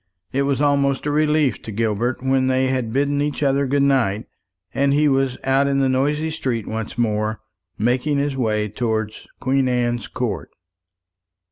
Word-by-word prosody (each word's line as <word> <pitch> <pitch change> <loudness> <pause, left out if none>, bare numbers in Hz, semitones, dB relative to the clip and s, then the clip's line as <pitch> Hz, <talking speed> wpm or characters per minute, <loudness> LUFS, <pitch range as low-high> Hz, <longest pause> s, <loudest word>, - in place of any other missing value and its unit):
It 135 - 0
was 140 0 0
almost 140 -2 +2
a 145 - 0
relief 150 -7 +2
to 110 - -8
Gilbert 115 +3 -1
when 130 0 +2
they 130 0 +2
had 130 -4 -1
bidden 140 +3 +1
each 150 0 -2
other 140 0 +2
good 140 +1 +2
night, 120 -7 +1 0.5
and 140 0 +2
he 150 +1 +3
was 135 -2 +1
out 135 +1 +2
in 140 0 +1
the 135 - +3
noisy 150 +4 0
streets 125 -8 -2
once 110 0 -5
more, 110 -2 0 0.4
making 125 +6 +1
his 140 -1 0
way 110 -4 0
towards 110 0 -3
Queen 135 0 +1
Anne's 120 -1 0
Court. 105 - -3
130 Hz, 165 wpm, -21 LUFS, 115-140 Hz, 0.5 s, he